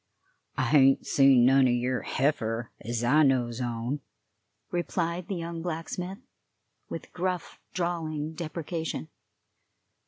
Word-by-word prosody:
"I -, -, +2 dB
hain't 135 Hz, +1 st, +5 dB
seen 135 Hz, -3 st, +5 dB
none 135 Hz, 0 st, +6 dB
o' -, -, +2 dB
yer 125 Hz, +1 st, 0 dB
heifer, 120 Hz, -5 st, -1 dB
ez 120 Hz, +1 st, -2 dB
I 145 Hz, +6 st, +5 dB
knows 125 Hz, -4 st, +2 dB
on," 120 Hz, +3 st, -2 dB, 0.7 s
replied 175 Hz, 0 st, -1 dB
the 195 Hz, -, -2 dB
young 170 Hz, -1 st, -4 dB
blacksmith, 175 Hz, +3 st, -4 dB, 0.7 s
with -, -, -7 dB
gruff, 180 Hz, -1 st, -3 dB
drawling 160 Hz, -3 st, -2 dB
deprecation. 160 Hz, -, -4 dB
145 Hz, 115 wpm, -28 LUFS, 125-170 Hz, 0.7 s, none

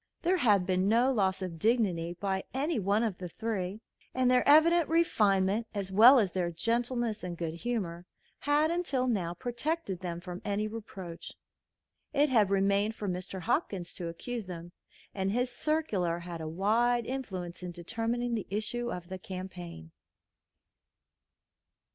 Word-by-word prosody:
There 365 Hz, +2 st, +3 dB
had 205 Hz, -, +3 dB
been 185 Hz, +1 st, +1 dB
no 240 Hz, +4 st, +4 dB
loss 195 Hz, -5 st, +1 dB
of 170 Hz, -3 st, -5 dB
dignity 180 Hz, -6 st, +1 dB
by 190 Hz, -1 st, -1 dB
any 290 Hz, +1 st, 0 dB
one 205 Hz, +3 st, +2 dB
of 210 Hz, -6 st, -2 dB
the 180 Hz, -1 st, -5 dB
three, 205 Hz, 0 st, -3 dB, 0.3 s
and 255 Hz, -1 st, +3 dB
their 250 Hz, 0 st, +4 dB
evident 325 Hz, +2 st, +6 dB
refinement, 215 Hz, -, +2 dB
as 195 Hz, -2 st, -3 dB
well 235 Hz, +8 st, +8 dB
as 205 Hz, -7 st, +2 dB
their 180 Hz, -1 st, -1 dB
gentleness 230 Hz, +5 st, -1 dB
and 175 Hz, -1 st, -5 dB
good 165 Hz, -2 st, -3 dB
humor, 180 Hz, -3 st, -3 dB, 0.3 s
had 295 Hz, +2 st, +2 dB
until 335 Hz, -7 st, 0 dB
now 185 Hz, -8 st, -1 dB
protected 245 Hz, -, -3 dB
them 175 Hz, -2 st, -4 dB
from 180 Hz, 0 st, -7 dB
any 210 Hz, +1 st, -1 dB
reproach. 190 Hz, -6 st, -8 dB, 0.8 s
It 290 Hz, +1 st, +3 dB
had 220 Hz, -6 st, +4 dB
remained 200 Hz, +2 st, +2 dB
for 210 Hz, -, -5 dB
Mr. 185 Hz, +1 st, -4 dB
Hopkins 195 Hz, -, -1 dB
to 175 Hz, -, -4 dB
accuse 220 Hz, +6 st, -5 dB
them, 175 Hz, -1 st, -7 dB, 0.4 s
and 190 Hz, -1 st, -1 dB
his 245 Hz, +3 st, 0 dB
circular 230 Hz, -, 0 dB
had 170 Hz, -1 st, -7 dB
a 160 Hz, -, -4 dB
wide 230 Hz, +7 st, +2 dB
influence 190 Hz, -11 st, -5 dB
in 180 Hz, -, -5 dB
determining 230 Hz, +7 st, -2 dB
the 220 Hz, -3 st, -2 dB
issue 225 Hz, +4 st, -2 dB
of 180 Hz, -1 st, -6 dB
the 190 Hz, 0 st, -6 dB
campaign. 180 Hz, -, -8 dB
200 Hz, 155 wpm, -30 LUFS, 180-240 Hz, 0.8 s, well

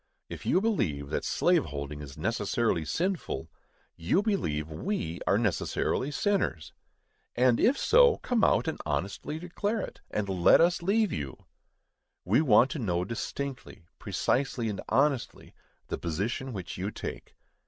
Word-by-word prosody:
If -, -, -7 dB
you 185 Hz, -, +3 dB
believe 75 Hz, -, -1 dB
that -, -, -1 dB
slave -, -, +2 dB
holding 70 Hz, +1 st, -6 dB
is 70 Hz, -2 st, -9 dB
necessarily 105 Hz, -9 st, 0 dB
sinful, 170 Hz, -, -2 dB, 0.4 s
you 95 Hz, -, +1 dB
believe 80 Hz, -, -1 dB
we 85 Hz, -, -3 dB
are 100 Hz, -, +4 dB
necessarily 110 Hz, -, 0 dB
sinners; 190 Hz, -, -1 dB, 0.6 s
and, 125 Hz, -1 st, +4 dB
if 255 Hz, +5 st, +4 dB
so, 485 Hz, -1 st, +5 dB
come 245 Hz, -3 st, 0 dB
out -, -, +3 dB
and 160 Hz, -, -2 dB
honestly 85 Hz, -, -3 dB
declare 200 Hz, +6 st, -2 dB
it, -, -, -8 dB
and 105 Hz, -1 st, -2 dB
let 95 Hz, -3 st, +5 dB
us 175 Hz, +1 st, +3 dB
leave 205 Hz, +4 st, +2 dB
you. 70 Hz, -3 st, -6 dB, 0.8 s
We 105 Hz, -, +4 dB
want 125 Hz, -2 st, +5 dB
to 155 Hz, -, -3 dB
know 90 Hz, -6 st, 0 dB
distinctly, 125 Hz, -2 st, -5 dB
precisely 125 Hz, -3 st, 0 dB
and 100 Hz, -, -4 dB
honestly, 140 Hz, -2 st, 0 dB, 0.4 s
the -, -, -3 dB
position 100 Hz, +11 st, -2 dB
which 95 Hz, -5 st, -6 dB
you 95 Hz, +2 st, -2 dB
take. -, -, -7 dB
120 Hz, 145 wpm, -29 LUFS, -, 0.8 s, so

